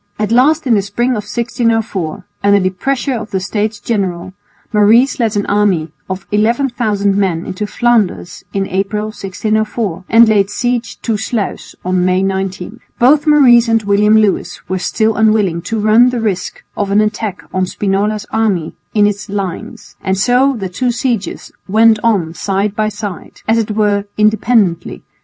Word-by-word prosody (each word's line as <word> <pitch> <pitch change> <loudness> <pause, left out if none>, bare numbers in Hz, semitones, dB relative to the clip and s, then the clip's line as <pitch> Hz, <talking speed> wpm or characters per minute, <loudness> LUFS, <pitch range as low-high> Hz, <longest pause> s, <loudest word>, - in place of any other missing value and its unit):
At 210 +1 -2
last 290 +6 +3
in 250 - +3
the 205 - +3
spring 220 +6 -1
of 210 -4 -2
1604, 225 -7 -2 0.2
under 200 0 +4
the 185 -1 0
pressure 270 +8 -2
of 225 -3 -5
the 195 - -1
States 210 +2 -2
General, 190 -5 -3 0.4
Maurice 225 +7 +4
led 225 -3 0
an 205 - 0
army 195 -7 +1 0.2
of 190 0 -5
11,000 215 -2 +1
men 185 -4 0
into 205 +3 -4
Flanders 220 -6 0
in 195 -1 -1
April, 200 +3 -2
1604, 215 -1 -2
and 230 0 +6
laid 200 -2 +2
siege 245 +1 -2
to 225 -3 0
Sluis 220 0 -4
on 185 0 +1
May 185 +1 +2
19. 190 +2 -3 0.2
Both 290 +5 +4
Maurice 250 -6 +6
and 225 -1 +2
William 210 +2 +3
Lewis 215 -3 -1
were 185 0 -2
still 220 +4 0
unwilling 210 -6 +2
to 225 - -1
run 220 +4 +5
the 250 -1 -2
risk 195 -5 -3
of 205 -1 -2
an 200 +1 +3
attack 215 -1 -2
on 185 -1 0
Spinola's 205 +2 -1
army 205 -7 0 0.2
in 210 -1 +4
its 205 0 -2
lines, 195 -3 -6
and 190 0 -1
so 250 +6 +2
the 195 -3 -4
two 245 +8 -1
sieges 240 -3 -3 0.2
went 220 +2 +4
on 195 -8 +1
side 195 +3 -2
by 215 0 0
side, 205 -4 -8
as 225 +1 +3
it 220 - -2
were 205 -1 0
independently. 215 -4 +1
210 Hz, 165 wpm, -15 LUFS, 195-230 Hz, 0.4 s, and